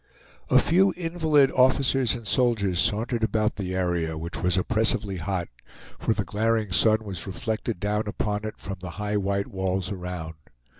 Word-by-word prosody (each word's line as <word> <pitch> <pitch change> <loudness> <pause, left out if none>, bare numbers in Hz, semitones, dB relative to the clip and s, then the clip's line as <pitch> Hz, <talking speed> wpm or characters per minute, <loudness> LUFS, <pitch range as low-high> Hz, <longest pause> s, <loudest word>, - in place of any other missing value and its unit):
A - - +5
few 190 +3 +4
invalid 160 -5 +2
officers 130 -1 +3
and 120 -2 -8
soldiers 105 -6 +1
sauntered 115 +3 0
about 110 0 0
the 95 -2 -3
area, 85 -3 -1
which 85 +2 -5
was 90 +1 +2
oppressively 105 -2 +1
hot; 90 +1 -2 0.5
for 115 - 0
the 105 - -2
glaring 110 0 0
sun 110 +4 +4
was 95 -3 -6
reflected 110 +1 -3
down 105 +2 -1
upon 105 0 -2
it 110 - -5
from 95 0 -6
the 90 0 -7
high 105 0 -1
white 100 0 0
walls 95 -1 -2
around. 90 -4 -5
105 Hz, 160 wpm, -25 LUFS, 95-115 Hz, 0.5 s, A